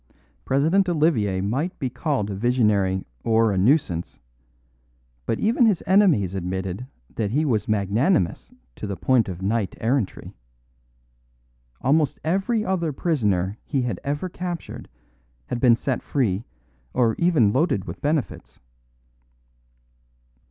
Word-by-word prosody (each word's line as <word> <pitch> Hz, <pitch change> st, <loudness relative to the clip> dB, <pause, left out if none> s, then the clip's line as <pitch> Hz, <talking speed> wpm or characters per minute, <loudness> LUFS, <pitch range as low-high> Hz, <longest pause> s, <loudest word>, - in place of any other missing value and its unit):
President 165 Hz, +8 st, +2 dB
Olivier 125 Hz, -, +1 dB
might 135 Hz, -, -2 dB
be 135 Hz, -, -2 dB
called 125 Hz, -4 st, -2 dB
a -, -, -4 dB
visionary 105 Hz, -4 st, +1 dB, 0.2 s
or 115 Hz, -1 st, +3 dB
a 95 Hz, -, -1 dB
nuisance; 95 Hz, -, +1 dB, 1.1 s
but 115 Hz, -, -1 dB
even 230 Hz, +2 st, +3 dB
his 205 Hz, -6 st, +1 dB
enemies 175 Hz, -, +3 dB
admitted 95 Hz, +4 st, -4 dB, 0.3 s
that 105 Hz, -3 st, 0 dB
he 150 Hz, +8 st, +1 dB
was 110 Hz, -7 st, 0 dB
magnanimous 105 Hz, -, +1 dB, 0.3 s
to -, -, -5 dB
the 100 Hz, -2 st, -4 dB
point 120 Hz, +2 st, +2 dB
of 90 Hz, 0 st, -6 dB
knight 105 Hz, -1 st, -1 dB
errantry. 115 Hz, -2 st, -1 dB, 1.5 s
Almost 145 Hz, +2 st, +2 dB
every 195 Hz, +7 st, 0 dB
other 170 Hz, -4 st, 0 dB
prisoner 105 Hz, -, 0 dB
he 135 Hz, -4 st, -1 dB
had 115 Hz, -7 st, -3 dB
ever 145 Hz, +6 st, -2 dB
captured 175 Hz, -2 st, -6 dB, 0.6 s
had 120 Hz, -, -4 dB
been 120 Hz, -2 st, +5 dB
set 130 Hz, +2 st, -2 dB
free 115 Hz, -7 st, -1 dB, 0.5 s
or 120 Hz, -3 st, +3 dB
even 155 Hz, -, +3 dB
loaded 130 Hz, -, +1 dB
with -, -, -8 dB
benefits. 150 Hz, -2 st, -2 dB
125 Hz, 125 wpm, -23 LUFS, 100-160 Hz, 1.5 s, been